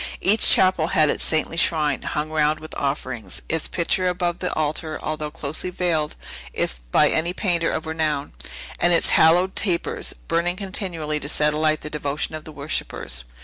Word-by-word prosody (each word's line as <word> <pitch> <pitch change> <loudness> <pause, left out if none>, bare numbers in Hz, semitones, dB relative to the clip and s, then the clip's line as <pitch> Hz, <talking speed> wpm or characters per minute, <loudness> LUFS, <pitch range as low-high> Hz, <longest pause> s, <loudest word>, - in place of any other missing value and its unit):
Each 210 +4 +4
chapel 185 -4 +4
had 155 -3 +3
its - - -3
saintly 160 +1 0
shrine, 150 -4 +2
hung 150 +1 -3
round 155 0 +2
with 155 - -10
offerings; 130 -8 -3
its 160 -1 0
picture 185 +1 0
above 175 -1 -1
the 180 - -2
altar, 155 +1 -1
although 155 -1 -3
closely 155 +3 -3
veiled, 170 -4 0 0.4
if - - -2
by - - +5
any 170 +2 0
painter 175 -4 +1
of - - -3
renown; 155 -3 -1 0.5
and 175 - +4
its 170 - +3
hallowed 175 +4 +5
tapers, 180 -4 -1
burning 170 +2 +1
continually, 180 -6 -3
to 145 - -5
set 150 0 +2
alight 155 0 +1
the 150 - -6
devotion 150 0 -2
of 155 -1 -6
the 155 - -8
worshippers. 140 - -3
155 Hz, 170 wpm, -23 LUFS, 150-175 Hz, 0.5 s, by